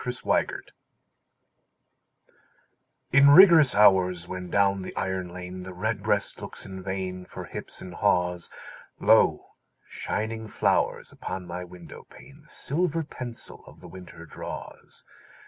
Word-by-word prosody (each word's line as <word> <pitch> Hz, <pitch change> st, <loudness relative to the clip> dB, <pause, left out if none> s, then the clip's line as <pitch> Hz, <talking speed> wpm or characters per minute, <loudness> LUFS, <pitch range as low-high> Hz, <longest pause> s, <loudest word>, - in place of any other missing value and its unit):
XVII—WINTER 125 Hz, -1 st, -1 dB, 2.5 s
In 140 Hz, +1 st, +7 dB
rigorous 160 Hz, -4 st, +8 dB
hours, 90 Hz, -4 st, +4 dB
when 90 Hz, -1 st, -6 dB
down 100 Hz, 0 st, +2 dB
the 95 Hz, -, -8 dB
iron 95 Hz, -1 st, -3 dB
lane 90 Hz, +1 st, -8 dB
The 90 Hz, 0 st, -9 dB
redbreast 90 Hz, -, -1 dB
looks -, -, -8 dB
in 95 Hz, 0 st, -8 dB
vain 95 Hz, -1 st, -4 dB
For -, -, -9 dB
hips -, -, -8 dB
and 90 Hz, -, -9 dB
haws, 90 Hz, -3 st, 0 dB, 0.5 s
Lo, -, -, +3 dB, 0.4 s
shining 110 Hz, +1 st, -4 dB
flowers -, -, 0 dB
upon 90 Hz, 0 st, -6 dB
my 90 Hz, +1 st, -6 dB
window 85 Hz, -3 st, -12 dB
pane 140 Hz, +3 st, -16 dB
The 150 Hz, -, -24 dB
silver 165 Hz, +1 st, -2 dB
pencil 125 Hz, -5 st, -9 dB
of -, -, -15 dB
the -, -, -12 dB
winter 90 Hz, -2 st, -12 dB
draws. -, -, -9 dB
95 Hz, 125 wpm, -26 LUFS, 90-120 Hz, 2.5 s, rigorous